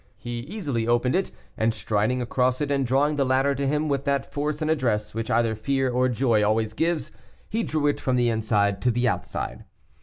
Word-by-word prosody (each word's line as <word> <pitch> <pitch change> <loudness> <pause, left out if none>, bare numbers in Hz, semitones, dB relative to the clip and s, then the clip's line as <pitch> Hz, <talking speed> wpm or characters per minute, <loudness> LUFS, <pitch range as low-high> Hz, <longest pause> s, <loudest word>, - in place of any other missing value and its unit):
He 120 0 -5
easily 140 - -3
opened 120 +2 +2
it, 190 - 0 0.3
and 110 0 +1
striding 110 +5 0
across 125 +1 +1
it 145 -1 -1
and 135 -2 +1
drawing 145 +4 +2
the 140 - +3
ladder 135 +2 +2
to 140 0 -2
him 150 +2 0
with 140 -2 0
that 140 -1 -1
force 150 +1 -2
and 155 0 0
address 110 -8 0
which 115 0 -4
either 115 -1 +2
fear 135 +4 0
or 125 +1 +2
joy 120 -3 +2
always 110 +1 +1
gives, 165 +5 -1 0.4
he 225 - 0
drew 155 -8 -1
it 145 - +1
from 130 - +1
the 120 -1 +2
inside 105 -3 +1
to 125 - +2
the 120 +1 +1
outside. 60 - -3
125 Hz, 210 wpm, -25 LUFS, 115-140 Hz, 0.4 s, the